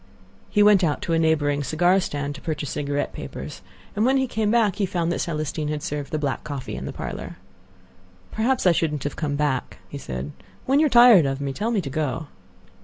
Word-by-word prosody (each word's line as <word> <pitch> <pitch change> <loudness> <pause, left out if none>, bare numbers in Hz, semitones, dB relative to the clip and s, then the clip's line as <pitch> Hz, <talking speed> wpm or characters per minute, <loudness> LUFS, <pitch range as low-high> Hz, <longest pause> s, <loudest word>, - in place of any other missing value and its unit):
He 205 - +4
went 205 -2 +6
out 150 -4 0
to 165 - -1
a 165 - +3
neighboring 145 -3 +2
cigar 175 +7 +3
stand 145 -5 -3
to 145 - -11
purchase 155 -3 -4
cigarette 145 0 -2
papers, - - -8 0.3
and 210 - +1
when 265 +3 +3
he 265 - +2
came 220 -4 -1
back 220 -4 +2
he 200 - 0
found 170 -2 -1
that - - -2
Celestine 155 -1 -3
had 150 -1 -3
served 145 -1 -4
the 155 - 0
black 145 -3 -2
coffee 145 -3 -6
in - - -6
the - - -4
parlor. - - -6 0.9
"Perhaps 235 +2 0
I 180 - +7
shouldn't 155 -4 -1
have 145 - -3
come 145 -3 -2
back," 145 -2 -1
he 140 - -7
said. 65 - -5 0.3
"When 270 +2 +3
you 310 - +4
are - - -1
tired 240 - +7
of 135 0 -2
me, 140 -1 -3
tell 210 +10 -2
me 220 -4 +1
to 145 - -6
go." 155 +1 -2
155 Hz, 220 wpm, -24 LUFS, 145-205 Hz, 0.9 s, I